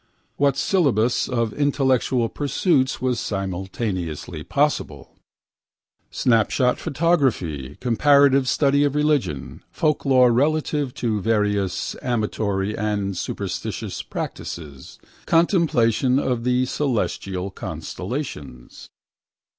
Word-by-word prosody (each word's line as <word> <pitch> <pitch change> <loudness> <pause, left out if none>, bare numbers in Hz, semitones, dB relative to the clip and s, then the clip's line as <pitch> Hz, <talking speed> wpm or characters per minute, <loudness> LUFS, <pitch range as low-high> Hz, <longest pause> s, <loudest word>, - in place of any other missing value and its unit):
What 140 -1 +2
syllabus 135 - +1
of 115 -3 -1
intellectual 130 -4 +1
pursuits 140 - 0
was 125 -2 +1
simultaneously 95 -4 -4
possible? 140 - -1 1.0
Snapshot 125 +2 +2
photography, 130 - 0
comparative 135 +2 +4
study 140 0 +3
of 145 -1 0
religions, 150 - -1
folklore 135 -5 +3
relative 145 +1 0
to 110 -4 -1
various 105 -3 0
amatory 105 -4 -1
and 100 -2 -2
superstitious - - -4
practices, 70 -5 -7 0.3
contemplation 135 - +3
of 125 -4 -1
the 125 0 +2
celestial 100 -9 -2
constellations. 95 - -7
125 Hz, 85 wpm, -22 LUFS, 100-140 Hz, 1.0 s, comparative